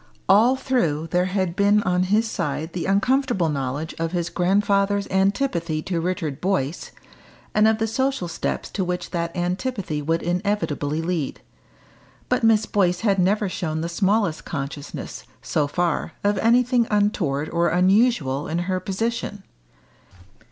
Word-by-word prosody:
All 225 +7 +5
through 170 - 0
there 180 0 +2
had 185 -2 -1
been 205 +1 +3
on 180 0 +1
his 220 +3 +3
side 160 -5 -3
the 180 - -3
uncomfortable 205 - +2
knowledge 140 +2 -3
of 165 +1 -2
his 170 -2 -1
grandfather's 200 +2 +1
antipathy 190 - 0
to 175 -3 -2
Richard 165 -5 -3
Boyce, 180 -5 -1 0.6
and 215 +1 +4
of 220 0 +3
the 225 - 0
social 265 -1 -1
steps 170 - -3
to 195 - -1
which 180 0 -3
that 170 0 -3
antipathy 180 - -2
would 165 +3 -1
inevitably 175 -5 -1
lead. 165 -5 -2 0.9
But - - +1
Miss 220 -1 +4
Boyce 180 -4 +1
had 200 -4 +2
never 200 +3 +2
shown 160 -4 -3
the 170 - -3
smallest 195 -1 +1
consciousness, 140 -1 -6 0.2
so 150 -2 0
far, 175 +3 -1
of 205 0 +2
anything 240 +1 +3
untoward 180 -9 +1
or 170 0 +2
unusual 180 - +2
in 165 - -2
her 185 0 -1
position. 205 +1 -3
185 Hz, 145 wpm, -23 LUFS, 165-210 Hz, 0.9 s, All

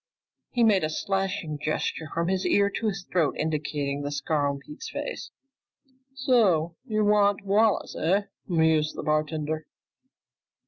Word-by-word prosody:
He 240 - +1
made 205 -5 +4
a 155 - 0
slashing 195 -3 -2
gesture 155 +1 -2
from 165 0 -1
his 190 0 0
ear 200 0 +3
to 225 - -2
his 195 -3 -2
throat, 165 -5 +2
indicating 150 -2 -2
the 145 - -3
scar 145 +1 0
on 140 - -3
Pete's 150 +2 -9
face. - - -5 0.9
"So 200 -12 +2
you 215 -2 +1
want 205 -1 +3
Wallace, 210 +2 +2
eh?" 190 +6 +2 0.2
mused 160 -3 +2
the - - -5
bartender. 155 0 -1
165 Hz, 140 wpm, -26 LUFS, 155-200 Hz, 0.9 s, made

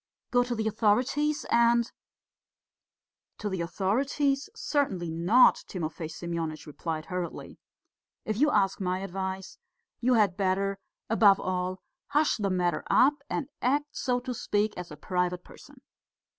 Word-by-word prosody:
Go 245 0 +4
to 245 -1 -2
the 220 -1 -1
authorities 255 +8 +1
and 235 0 +4 0.7
..." - - -63
"To 210 - -3
the 190 -3 -2
authorities? 270 - 0
Certainly 195 - -1
not," 175 +10 +5
Timofey 160 -3 -4
Semyonitch 165 -1 -4
replied 155 +1 -5
hurriedly. 180 -2 -5 0.7
"If 215 -1 -2
you 300 +4 +4
ask 195 -7 +1
my 185 0 -1
advice, 190 0 -5 0.4
you 250 +1 +3
had 205 -5 +3
better, 195 0 0 0.3
above 210 -3 +5
all, 185 0 -2 0.2
hush 295 +1 +2
the 200 -3 -1
matter 175 -3 0
up 270 +4 +5 0.2
and 290 - -2
act, 290 +3 0
so 250 -2 0
to 250 0 -4
speak, 210 -2 0
as 180 -1 -7
a 150 - -10
private 180 +2 -1
person. 285 -3 -16
200 Hz, 140 wpm, -28 LUFS, 180-245 Hz, 0.7 s, not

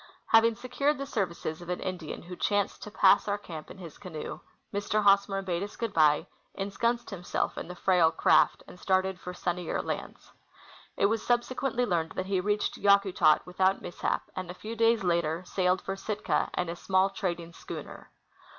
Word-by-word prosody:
Having 225 0 +5
secured 275 +5 0
the 275 - -3
serAdces 175 - -3
of 175 - -10
an 180 - -2
Indian 180 -4 -5
Avho 180 +1 -9
chanced 205 -1 0
to - - -7
pass 195 -1 +4
our 205 0 0
camp 165 -6 -9
in - - -11
his 170 -4 -10
canoe, 165 -6 -6 0.3
Mr. 205 +1 0
Hosmer 200 -1 +4
bade 175 -2 -2
us 205 +1 -5
good 230 -3 -3
bye, 150 -2 +4 0.3
ensconced 230 +5 -1
himself 180 -3 -2
in - - -6
the 180 - -7
frail 180 -3 +4
craft, - - +3
and 180 - -13
started 190 0 +1
for 180 - -6
sunnier 175 -1 -2
lands. - - -5 0.7
It - - +3
was 220 +2 +1
subsequently 245 +1 0
learned 170 -6 -1
that 185 - -3
he 190 -1 0
reached 210 +2 0
Yakutak 200 -6 +4
Avithout 190 +2 +1
mishap, 175 - -2
and 185 -1 -5
a 180 - -6
fcAV 220 +4 -7
days 230 -1 +3
later 170 -1 0
sailed 185 0 +1
for 195 - -3
Sitka 210 +2 -1
in 180 - 0
a 170 - -4
small 190 +2 +2
trading 175 -4 -3
schooner. - - -9
190 Hz, 180 wpm, -29 LUFS, 175-205 Hz, 0.7 s, Having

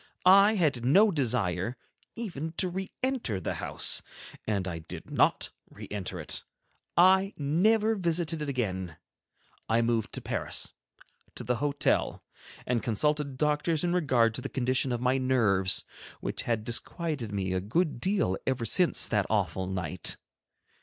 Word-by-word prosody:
I 200 +3 +7
had 150 - +1
no 195 - +5
desire 120 - -1 0.4
even 165 -9 -5
to 185 - +2
re 190 +2 -4
enter 255 - -1
the 85 - -3
house, - - +2 0.5
and 100 -4 -1
I 85 -2 -4
did 80 - -10
not - - +2 0.2
re - - -10
enter 95 -3 -4
it; 75 - -2 0.5
I 190 +3 +5
never 210 +10 +2
visited 170 -4 -1
it 150 - -3
again. 95 - -3 0.7
I 115 +1 +3
moved 115 -2 0
to - - -2
Paris, - - -2 0.6
to - - -6
the 125 -1 0
hotel, 145 0 0 0.4
and 120 -2 0
consulted 140 +4 0
doctors 150 +2 +1
in 175 0 +1
regard 130 -10 +3
to - - -5
the - - -5
condition 130 0 0
of 120 -1 -2
my 130 +1 +2
nerves, 110 -8 +2 0.3
which - - -4
had 115 -2 0
disquieted 125 - -2
me 95 -2 -2
a 95 - 0
good 145 - 0
deal 185 - +1
ever 130 -3 0
since 175 - +3
that 105 -4 0
awful 95 -3 0
night. 90 -3 0
130 Hz, 150 wpm, -29 LUFS, 105-170 Hz, 0.7 s, I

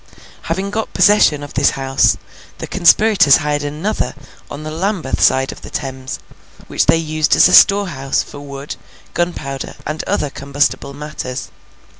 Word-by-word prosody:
Having 190 +4 -3
got 220 +1 -4
possession 180 -8 +4
of 145 - -9
this - - +3
house, 135 0 +2 0.4
the - - -6
conspirators 195 -4 +4
hired 145 -1 -2
another 155 +9 -3 0.3
on 150 - -8
the 155 - -6
Lambeth 180 -3 -2
side 135 0 +3
of - - -12
the - - -10
Thames, 130 -1 -5 0.5
which - - 0
they - - +5
used 155 -1 0
as - - +6
a 180 - 0
storehouse 180 -10 +4
for 145 - -11
wood, 140 0 -8 0.4
gunpowder, 145 -6 -3
and 155 +1 -4
other 145 -2 -1
combustible 140 0 -2
matters. 145 -4 -6
150 Hz, 150 wpm, -17 LUFS, 140-175 Hz, 0.5 s, as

